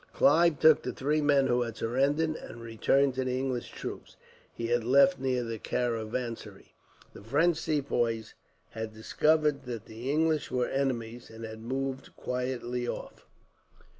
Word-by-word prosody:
Clive 170 - +4
took 155 -1 +6
the 125 - -4
three 150 +3 0
men 145 -2 +4
who 125 -2 +2
had 115 -2 -3
surrendered, 140 +7 +1
and 115 - -9
returned 115 +4 +2
to 130 +1 -1
the 130 0 -1
English 130 -2 -2
troops - - -8 0.4
he 115 - -5
had 120 0 +1
left 140 +10 +5
near 130 -2 0
the 115 -1 -5
caravansary. 115 0 -3 0.4
The - - -11
French 155 +10 +2
Sepoys 120 -8 -1 0.4
had 110 0 -6
discovered 150 +6 +1
that 120 -4 -6
the 115 +4 -7
English 155 0 +1
were 125 -1 0
enemies, 120 -4 -2
and 110 0 -8
had 110 0 -8
moved 135 +2 -4
quietly 125 -1 -3
off. - - -7
125 Hz, 150 wpm, -29 LUFS, 115-140 Hz, 0.4 s, took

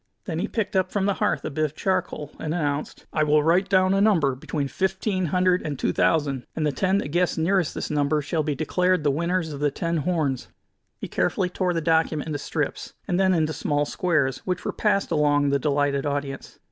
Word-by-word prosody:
Then 165 -3 -3
he - - -1
picked 220 -3 -3
up 185 -1 +1
from 200 -2 0
the 200 - +2
hearth 210 - +1
a - - -3
bit 155 +3 -1
of 155 -1 -2
charcoal, 185 -6 -2
and 155 +1 -2
announced: 145 -3 -3
"I 155 - +1
will 150 0 +3
write 180 +5 +3
down 185 0 +4
a 195 - +2
number 170 -11 +3
between 140 +2 -3
fifteen 190 +2 -1
hundred 180 +2 +2
and 145 -3 -4
two - - 0
thousand, 140 -6 +1
and 155 - -1
the 150 - +2
ten 190 +6 +1
that 200 - -2
guess 175 +3 +1
nearest 170 -1 +1
this - - -4
number 150 +1 +1
shall 155 +2 -1
be 150 -1 -1
declared 180 +3 +1
the 145 - +3
winners 170 +2 -1
of 140 - -6
the 145 0 +2
ten 170 +4 -2
horns." 150 -5 -1 0.5
He - - -6
carefully 180 - 0
tore 180 -1 -1
the 165 - 0
document 160 -1 +1
into 150 -2 -3
strips, - - -3
and 175 - 0
then 190 -1 +3
into 155 -1 +1
small 145 -1 0
squares, 145 -7 0
which 180 -1 -3
were - - -2
passed 200 -2 +1
along 145 -1 +3
the 140 - +2
delighted 145 0 0
audience. 140 -1 -4
160 Hz, 220 wpm, -24 LUFS, 145-185 Hz, 0.5 s, down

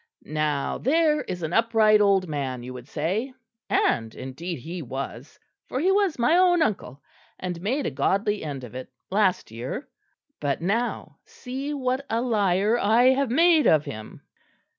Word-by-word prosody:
"Now 150 -2 -1
there 305 +2 +2
is 175 -2 -6
an 160 +2 -3
upright 220 -2 +4
old 195 -2 +3
man 135 -5 -3
you 125 +1 -7
would 125 0 -10
say; 195 - -2 0.3
and 115 -1 +1
indeed 160 +7 -6
he 165 +7 -7
was, 135 0 -7 0.3
for 255 - -3
he 365 +6 +3
was 395 -4 +2
my 250 +7 +3
own 355 -2 +4
uncle, 145 - -3 0.3
and 180 -2 -5
made 260 +9 -1
a - - -1
godly 200 +9 0
end 140 -4 -5
of 120 - -10
it 130 0 -8 0.2
last 190 - +1
year. 120 - -5 0.5
But 145 -2 -1
now 220 +8 -2
see 270 +3 -6
what 260 0 -1
a 225 - 0
liar 210 -2 +2
I 235 +5 +4
have 265 0 +2
made 320 +2 +4
of 155 -2 +4
him!" 110 0 -9
200 Hz, 160 wpm, -25 LUFS, -, 0.5 s, upright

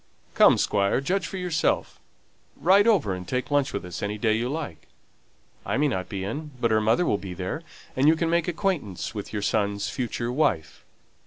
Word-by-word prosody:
Come, - - +6
Squire, 100 +3 +2
judge 175 +5 -1
for 195 - -6
yourself. 180 -4 0 0.6
Ride 195 +5 +5
over 175 - +3
and 90 -1 -7
take 125 +2 -2
lunch 145 -1 +2
with 100 - -4
us 90 - -7
any 105 +1 -2
day 110 +1 +2
you 115 +3 -1
like. 145 - -5 0.8
I - - -1
may 150 +2 +3
not 95 -7 -3
be 100 -3 -4
in; 145 +10 -4
but 115 -2 +1
her 110 0 +3
mother 115 +12 +2
will 100 - +1
be 95 -2 -7
there, 95 - -4 0.3
and 135 +3 +3
you 160 - +6
can 165 +1 -1
make 170 0 +1
acquaintance 165 - -2
with 105 -3 -6
your 105 -2 -3
son's 100 -1 0
future 120 -1 -3
wife." 100 - 0
120 Hz, 195 wpm, -25 LUFS, 100-160 Hz, 0.8 s, Come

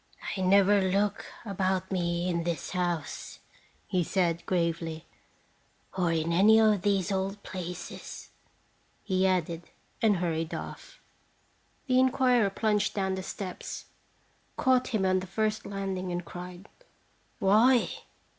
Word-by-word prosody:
"I 190 - -3
never 200 +2 +5
look 195 +2 0 0.2
about 190 -2 -1
me 175 -1 0
in 170 -2 0
this 170 -1 -3
house," 175 -4 -3 0.5
he 180 -1 0
said, 170 -2 0
gravely, 165 -2 -1 0.9
"or 180 -3 +1
in 165 0 0
any 210 +5 +6
of 215 -3 +4
these 195 -2 +1
old 195 +1 -2
places," 180 -1 -7 0.7
he 190 -1 +2
added, 170 -2 -1 0.3
and 210 -3 +4
hurried 165 -2 -2
off. - - -8 0.9
The 255 -2 +3
inquirer 255 -4 +3
plunged 210 0 0
down 190 -2 0
the 190 - -3
steps, 185 -1 -6 0.7
caught 255 -1 +3
him 215 -6 0
on 185 0 +3
the 185 - -7
first 215 +2 -1
landing, 190 -2 -3
and 175 0 -3
cried: 180 +3 -9 0.7
"Why? 225 +6 +5
190 Hz, 125 wpm, -29 LUFS, 175-205 Hz, 0.9 s, any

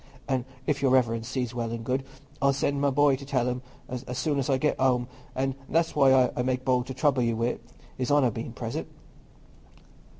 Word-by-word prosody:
An' 130 -2 0 0.2
if 140 0 0
Your 135 - +3
Reverence 115 -3 +2
sees 125 -2 -2
well 120 -1 -2
and 115 -1 -5
good, 130 +2 0 0.4
I'll 140 0 +4
send 140 +1 0
my 140 - +3
boy 140 0 +4
to 140 - -10
tell 130 -3 0
'em 125 0 -2 0.3
as 125 -1 -5 0.2
soon 145 0 0
as 135 - -1
I 135 - +3
get 150 +3 0
home; 125 -2 +2 0.3
an' 135 +1 0 0.2
that's 165 +1 +1
why 130 -2 +5
I - - 0
make 130 0 -1
bold 125 -1 +2
to 130 - -5
trouble 135 -1 +2
you 115 -1 +1
wi' 115 - +1
it, - - -6 0.4
His 125 - -1
Honour 140 -4 +4
being 115 +2 -5
present." 115 -1 -4
130 Hz, 210 wpm, -27 LUFS, 125-140 Hz, 0.4 s, why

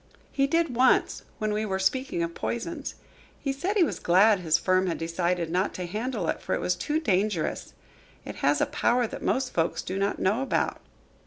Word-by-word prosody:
"He 275 0 +2
did, 330 -3 +1
once, 255 +2 +3 0.2
when 215 -1 -1
we 210 +1 -1
were 195 -3 -1
speaking 190 -1 0
of 170 0 -3
poisons. 290 - -4 0.4
He 275 - -2
said 365 +10 -2
he 375 - +6
was 320 - -1
glad 195 +4 +5
his 160 -3 +2
firm 185 +1 +2
had 170 - -1
decided 170 0 -1
not 185 +3 0
to 180 - -4
handle 220 +9 -3
it, - - -2
for - - -1
it - - -2
was - - +1
too 305 +1 -1
dangerous. 200 - -1 0.5
It - - -7
has - - +2
a - - +4
power 245 0 +1
that - - -7
most 265 -1 0
folks 165 -1 0
do 190 +1 -3
not 200 +1 0
know 205 +7 +1
about." 270 - -1
210 Hz, 200 wpm, -27 LUFS, 180-265 Hz, 0.5 s, he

